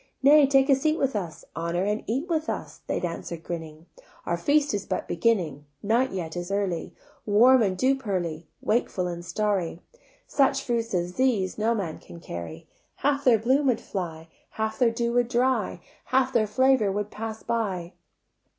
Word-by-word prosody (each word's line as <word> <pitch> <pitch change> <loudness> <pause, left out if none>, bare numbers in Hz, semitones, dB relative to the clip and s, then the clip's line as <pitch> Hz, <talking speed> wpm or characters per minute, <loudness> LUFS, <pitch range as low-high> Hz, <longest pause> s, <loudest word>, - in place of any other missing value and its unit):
"Nay, 290 +1 +7
take 270 0 +4
a 275 - +6
seat 310 +4 +1
with 270 -3 0
us, 175 -6 -4
Honour 170 +2 -1
and 210 +2 -1
eat 265 +9 -1
with 320 -3 -1
us," - - -5
They - - -1
answer'd 170 -1 -5
grinning: 160 -2 -7 0.4
"Our - - 0
feast 295 -2 +2
is 205 - -1
but - - -3
beginning. 165 -8 0 0.2
Night 235 +5 +2
yet 170 -4 -4
is 175 +1 -4
early, 195 -5 -2 0.3
Warm 240 +5 +6
and 190 -4 +1
dew 260 +7 +3
pearly, 175 - -3
Wakeful 215 -5 0
and 175 -1 -4
starry: 180 -1 -1 0.5
Such 275 -1 +2
fruits 230 -4 -1
as 175 0 -2
these 220 -8 +1
No 225 +2 +2
man 180 -7 -4
can 170 - -12
carry: 85 - -8 0.3
Half 285 0 0
their 245 -3 +6
bloom 260 +6 +2
would 250 - +2
fly, 165 -4 -5 0.2
Half 220 0 -3
their 245 -2 +5
dew 235 +1 -1
would 245 -1 +3
dry, 255 +2 0 0.2
Half 260 0 +1
their 220 -3 +3
flavour 260 -2 +3
would 205 +1 -3
pass 220 0 -6
by. 195 -7 -2
215 Hz, 175 wpm, -26 LUFS, 175-260 Hz, 0.5 s, Nay